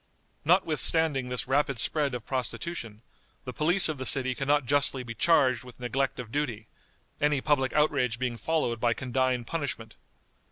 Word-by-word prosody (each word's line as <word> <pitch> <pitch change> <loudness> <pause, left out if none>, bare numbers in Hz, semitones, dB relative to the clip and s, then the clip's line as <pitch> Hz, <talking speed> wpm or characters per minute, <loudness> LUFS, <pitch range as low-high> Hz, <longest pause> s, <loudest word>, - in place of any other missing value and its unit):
Notwithstanding 155 -5 +2
this 125 0 -3
rapid 135 0 +1
spread 145 0 0
of 120 - -7
prostitution, 125 -3 -5 0.4
the 125 - -6
police 170 +7 +4
of 155 -4 -4
the 130 - -4
city 130 -2 +3
can 135 +2 -5
not 145 -2 +2
justly 140 0 +1
be 115 -1 -7
charged 130 -2 +3
with 125 -1 -13
neglect 135 +2 -2
of 120 -3 -7
duty, 120 -7 -3 0.6
any 145 -1 +2
public 135 -2 +1
outrage 140 -6 +1
being 125 -1 -2
followed 120 -2 -1
by 120 0 +1
condign 130 -1 -1
punishment. 135 -7 -5
130 Hz, 160 wpm, -28 LUFS, 125-150 Hz, 0.6 s, police